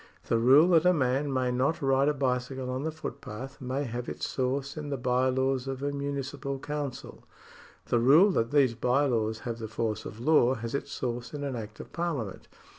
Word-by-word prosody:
The 115 - +3
rule 135 +9 +6
that 165 -3 +5
a 180 0 +5
man 135 0 +1
may 130 -1 0
not 130 +6 +1
ride 135 +1 +3
a - - +1
bicycle 130 -1 -1
on 130 +1 -2
the 160 +2 -2
footpath 135 -3 -8
may 130 +3 -2
have 120 -1 -4
its - - -4
source 135 +1 -2
in 150 -2 -5
the 140 - -2
by 125 +1 +1
laws 130 0 0
of 135 0 -4
a 145 - 0
municipal 140 0 -4
council; 145 -2 -5 0.6
the 120 - +1
rule 150 - +6
that 115 -9 0
these 140 -4 +4
by 125 +5 +2
laws 110 -4 0
have 115 -1 -4
the 110 - -5
force 110 -1 -2
of 110 - -8
law 130 -1 +4
has 115 -1 -5
its 140 - -3
source 120 0 -4
in 145 - -4
an 140 -2 -3
act 110 -2 -7
of - - -10
Parliament. 150 - -3
130 Hz, 205 wpm, -28 LUFS, 120-140 Hz, 0.6 s, rule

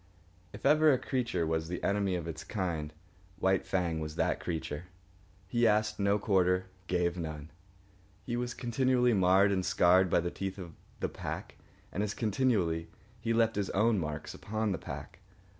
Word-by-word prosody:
If - - -10
ever 155 +2 +6
a 130 - +4
creature 120 -11 -1
was 80 0 -1
the 90 +1 -5
enemy 100 -2 +1
of 85 -2 -4
its 80 -1 -6
kind, 85 -7 -3 0.5
White 95 0 +1
Fang 85 -4 0
was 75 0 -5
that - - +1
creature. 80 -1 -4 0.6
He 120 +3 +3
asked 105 0 +2
no 100 +1 +3
quarter, 95 -3 +2 0.2
gave 90 -1 0
none. 80 -2 -6 0.7
He 120 - -3
was 120 0 -2
continually 125 0 +2
marred 95 +1 +5
and 95 -1 +1
scarred 90 +1 +4
by 85 - +3
the 85 0 -3
teeth 95 0 -4
of 85 -4 -8 0.3
the - - 0
pack, - - -6 0.3
and 100 - -2
as 105 -1 -2
continually 100 -8 +1 0.3
he 115 0 -2
left 115 -1 +3
his 100 -1 -1
own 110 0 +3
marks 75 -2 -4
upon 110 0 -2
the 90 - -2
pack. - - -8
95 Hz, 170 wpm, -31 LUFS, 85-110 Hz, 0.7 s, ever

